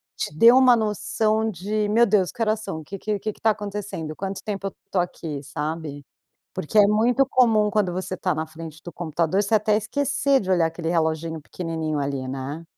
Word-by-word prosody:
te - - -4
dê 230 +9 +8
uma 255 -1 +7
noção 215 +1 0
de: 210 +3 -2
"Meu 230 +3 +5
Deus, 200 -4 +2
que 235 - -9
horas 215 -1 +1
são? 195 -7 -5
O - - -9
que 195 - -7
que 210 +1 -2
que 215 +2 -3
que - - -24
tá 225 - +4
acontecendo? 205 -7 -5
Quanto 195 0 -5
tempo 200 -2 -3
eu 195 - -6 0.2
tô 185 - +1
aqui?", 155 -5 -4
sabe? 150 0 -5 0.5
Porque 185 +8 -3
é 205 - +7
muito 235 +6 +3
comum 225 -5 +3
quando 205 -3 +1
você 185 0 -3
tá 180 - 0
na 160 +1 -3
frente 160 0 -10
do 175 - -8
computador, 170 +3 0
você 210 +2 +2
até 215 0 +2
esquecer 280 +4 +1
de 190 - -6
olhar 170 -3 +3
aquele 165 0 -4
reloginho 160 -1 -1
pequenininho 160 -1 -3
ali, 140 -2 -3
né? 135 +5 -5
190 Hz, 205 wpm, -24 LUFS, 160-215 Hz, 0.5 s, dê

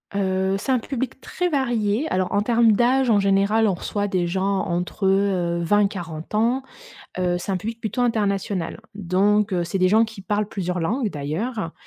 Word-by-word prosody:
Heu, 190 -1 0
c'est 265 - -2
un 255 - +3
public 260 +1 -4
très 360 +5 -2
varié. 240 -3 0
Alors, 185 0 0
en 205 - +2
termes 230 +1 +4
d'âge, 245 +4 +3
en 210 -3 +4
général, 200 +3 +3
on 195 - +2
reçoit 205 +3 -2
des 185 -3 0
gens 190 +3 0
entre, 180 +3 -3
heu, 190 -3 +1
20 205 +5 +3
et 200 - +3
40 165 -4 -7
ans. 235 +5 +1 0.6
Heu, 180 -1 +1
c'est 195 - -4
un 190 - +1
public 225 +5 -5
plutôt 220 +3 -2
international. 200 -6 -1
Donc 200 +2 +1
heu, 175 -1 0
c'est 185 +3 -3
des 185 0 +4
gens 220 +4 +5
qui 220 -2 -9
parlent 205 +2 -1
plusieurs 180 -3 -3
langues, 225 +8 0
d'ailleurs 165 - -3
200 Hz, 190 wpm, -23 LUFS, 185-225 Hz, 0.6 s, gens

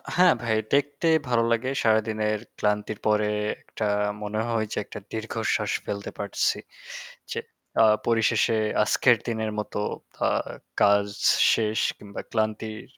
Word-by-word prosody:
হ্যাঁ 180 -2 +6
ভাই 110 -1 +1 0.2
দেখতে 145 +3 +1 0.2
ভালো 120 -2 +2
লাগে 115 +3 +1
সারাদিনের 110 -1 +1 0.2
ক্লান্তির 105 0 -1
পরে 105 0 +3 0.4
একটা 110 - -4 0.4
মনে 105 +1 -2
হয় 115 -2 0
যে - - -5
একটা - - -8
দীর্ঘশ্বাস 110 0 -1
ফেলতে 100 0 -4
পারছি। 100 -1 0 0.7
যে - - -2 0.4
আ - - +7 0.2
পরিশেষে 115 0 +3 0.3
আজকের 120 +2 +4
দিনের 110 -2 -1
মতো 105 - -4 0.5
আ - - +3 0.5
কাজ 100 0 +5 0.5
শেষ 110 -1 0 0.2
কিংবা 100 -1 -8
ক্লান্তির 110 0 -2
110 Hz, 125 wpm, -26 LUFS, 105-115 Hz, 0.7 s, আ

